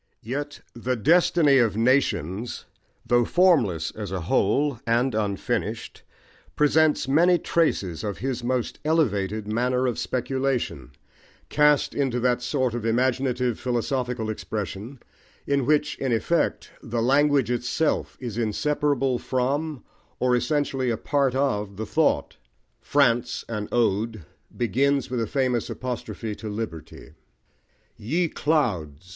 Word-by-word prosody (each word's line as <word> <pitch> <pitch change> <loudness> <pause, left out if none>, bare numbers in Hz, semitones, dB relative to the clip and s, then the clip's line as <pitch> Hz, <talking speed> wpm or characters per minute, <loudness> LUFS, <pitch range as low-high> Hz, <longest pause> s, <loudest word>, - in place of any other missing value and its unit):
Yet 145 +5 -5
The 125 +2 -2
Destiny 150 - +4
of 110 -4 +2
Nations, 115 - 0 0.4
though 120 0 +3
formless 120 - +2
as 105 -4 -7
a 95 -2 -3
whole, 120 - +1
and 120 +3 +2
unfinished, 105 -2 -2 0.5
presents 150 0 +3
many 170 +6 +4
traces 115 - 0
of 105 -2 -3
his 125 -1 -3
most 125 -1 -2
elevated 110 - 0
manner 125 +4 0
of 120 -4 -1
speculation, 125 - -2 0.6
cast 150 -1 +3
into 135 -4 0
that 125 0 +1
sort 130 -1 0
of 120 -2 -4
imaginative 125 +1 0
philosophical 125 -2 -2
expression, 110 +4 -5 0.5
in 140 -3 0
which, 150 0 +1
in 135 -2 -1
effect, 160 +9 0
the 115 +1 -3
language 140 +1 +3
itself 125 +6 -1
is 120 -3 -5
inseparable 135 +3 0
from, 140 +3 -2 0.4
or 125 0 +3
essentially 135 -1 0
a 115 - 0
part 140 0 0
of, 105 -8 -1
the 110 - -3
thought. - - +1 0.4
France, 120 -4 +1
an 105 -2 -4
Ode, 110 -4 0 0.3
begins 135 +3 +1
with 125 -2 -1
a 115 - -1
famous 125 -3 0
apostrophe 115 -3 -5
to 110 +1 -7
Liberty 105 -7 -7 0.8
Ye 165 +10 -1
Clouds! 95 - -1
125 Hz, 120 wpm, -25 LUFS, 110-140 Hz, 0.8 s, Destiny